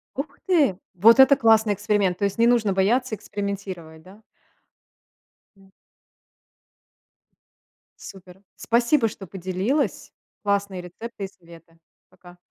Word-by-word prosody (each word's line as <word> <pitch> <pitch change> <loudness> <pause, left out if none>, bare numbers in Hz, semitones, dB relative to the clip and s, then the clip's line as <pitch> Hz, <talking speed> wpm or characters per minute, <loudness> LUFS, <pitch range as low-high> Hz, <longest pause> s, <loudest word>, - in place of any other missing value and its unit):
Ух 275 +4 -6
ты! 295 - +2 0.2
Вот 230 +8 +5
это 270 +1 +7
классный 220 -4 +3
эксперимент. 205 -3 0
То - - -5
есть, 200 +1 -3
не 230 - +4
нужно 230 -5 +2
бояться 220 +5 +1
экспериментировать, 195 -6 -7
да? 195 +5 -17 1.3
М. 195 0 -23 2.3
Супер. 190 0 -13
Спасибо, 235 +2 +1
что 200 -2 -9
поделилась. 190 - -3 0.3
Классные 200 -2 -1
рецепты 200 +4 -9
и - - -6
советы. 165 -3 -19 0.3
Пока. 180 -1 -18
200 Hz, 110 wpm, -23 LUFS, 185-230 Hz, 2.3 s, это